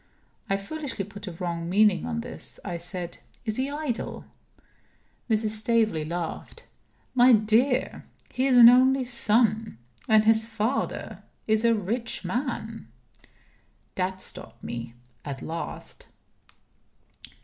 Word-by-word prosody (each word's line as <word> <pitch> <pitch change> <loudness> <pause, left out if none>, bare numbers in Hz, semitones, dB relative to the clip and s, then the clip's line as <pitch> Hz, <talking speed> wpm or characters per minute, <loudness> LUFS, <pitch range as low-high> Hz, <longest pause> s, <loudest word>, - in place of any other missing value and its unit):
I 195 - +2
foolishly 260 0 -4
put 205 0 -10
a 180 - -5
wrong 170 -1 -4
meaning 205 +2 +3
on 230 -1 -2
this. 245 - -7
I 175 -4 -3
said: 175 0 -5 0.3
"Is 215 -1 +1
he 265 +2 0
idle?" 290 -5 -4 1.0
Mrs. 215 -1 +1
Staveley 220 -6 +1
laughed. 170 0 -5 0.5
"My 250 0 +6
dear, 230 +5 +2 0.3
he 260 +1 +1
is 255 -2 +4
an 235 -1 +11
only 260 +2 +6
son 225 - +1 0.3
and 215 -1 +5
his 220 0 +3
father 225 +3 -2 0.2
is 220 0 +2
a 230 -1 +4
rich 225 +4 -2
man." 230 - -3 1.1
That 185 0 -2
stopped - - -7
me 115 0 -6 0.3
at 140 -2 -6
last. 165 +1 -7
220 Hz, 120 wpm, -26 LUFS, 190-245 Hz, 1.1 s, an